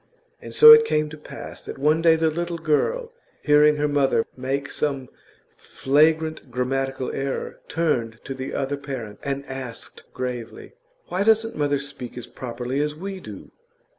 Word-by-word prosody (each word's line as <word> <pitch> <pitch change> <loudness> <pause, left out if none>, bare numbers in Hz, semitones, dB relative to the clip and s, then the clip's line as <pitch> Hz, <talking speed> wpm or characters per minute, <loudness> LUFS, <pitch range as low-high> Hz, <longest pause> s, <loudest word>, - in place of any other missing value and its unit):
And - - -9
so 455 0 +11
it 455 0 +10
came 150 - 0
to 155 - -9
pass 140 -1 -9
that - - -7
one 150 +4 +2
day 165 -1 +6
the 160 0 +1
little 170 +1 -3
girl, 165 - 0 0.3
hearing 150 0 +5
her 150 0 0
mother 140 -5 +2
make 135 +2 -3
some 135 -3 -2 0.5
flagrant 155 +3 +1
grammatical 135 +1 -2
error, 135 0 -4
turned 125 -9 -1
to 135 - -5
the 130 0 -6
other 140 +1 -2
parent 130 -7 -7
and 140 0 -3
asked 130 -4 -8
gravely: 125 -2 -6 0.4
'Why 185 - -1
doesn't 225 +2 +3
mother 145 -1 +1
speak 135 -3 -8
as 125 - -6
properly 125 +2 -4
as 150 0 -1
we 190 +4 -6
do? 105 - -11
140 Hz, 160 wpm, -23 LUFS, 130-160 Hz, 0.5 s, so